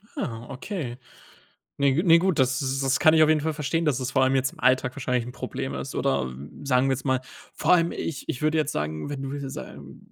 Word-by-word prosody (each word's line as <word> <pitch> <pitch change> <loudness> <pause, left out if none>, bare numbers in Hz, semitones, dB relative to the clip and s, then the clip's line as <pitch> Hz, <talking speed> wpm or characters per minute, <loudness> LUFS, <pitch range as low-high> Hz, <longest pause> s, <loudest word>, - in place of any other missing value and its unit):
Ah, 115 0 -4
okay. 135 - -5 0.8
Ne 140 -1 +4
g 165 - +2
ne 170 -2 +7
gut, 180 -2 +1
das 130 +2 +2
s 135 0 0
kann 155 0 +5
ich 160 - +6
auf 155 - +5
jeden 155 -1 +4
Fall 160 +1 -1
verstehen, 165 +2 -1
dass 140 -4 +1
es 130 0 -2
vor 130 - +2
allem 130 - +2
jetzt 130 0 +1
im - - -18
Alltag 130 0 +2
wahrscheinlich 125 -3 -1
'n 125 - -8
Problem 70 - -5
ist. 65 0 -5
Oder 65 - 0 0.3
sagen 135 -1 +3
wir 135 - +2
jetzt 130 - -7
mal, 130 -2 +1 0.3
vor - - +2
allem, 170 -1 +4
ich 155 -6 -5
ich 125 - -3
würde 155 +1 +2
jetzt 155 -1 0
sagen, 75 - -3
wenn 145 -2 -5
du 135 - -4
wenn 145 +1 -4
du 70 - -8
135 Hz, 245 wpm, -25 LUFS, 125-155 Hz, 0.8 s, ne